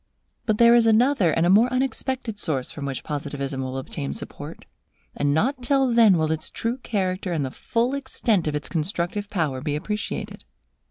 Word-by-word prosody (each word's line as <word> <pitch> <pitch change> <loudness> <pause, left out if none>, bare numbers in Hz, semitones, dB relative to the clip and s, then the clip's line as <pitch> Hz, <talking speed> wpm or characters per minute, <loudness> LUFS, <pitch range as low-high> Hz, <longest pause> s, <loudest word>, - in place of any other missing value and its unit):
But 215 -2 +2
there 235 +1 +7
is 235 -1 +5
another 225 -3 +4
and 165 +2 +2
a - - +3
more 225 +5 +5
unexpected 255 -3 -1
source 140 -10 -1
from 145 - -6
which 135 -2 -4
Positivism 140 -2 -4
will 130 0 -4
obtain 70 - -4
support; - - -7 0.5
and 145 0 +1
not 250 - +1
till 265 0 +2
then 225 -6 +6
will 160 -1 0
its 160 -1 -1
true 230 +2 -2
character 190 -6 -2
and 150 -4 -1
the 130 - -5
full 235 - -1
extent 240 - 0
of 150 - -1
its 150 - -3
constructive 175 +4 -2
power 155 -10 -1
be 145 0 -2
appreciated. 210 +7 -4
185 Hz, 180 wpm, -24 LUFS, 150-235 Hz, 0.5 s, there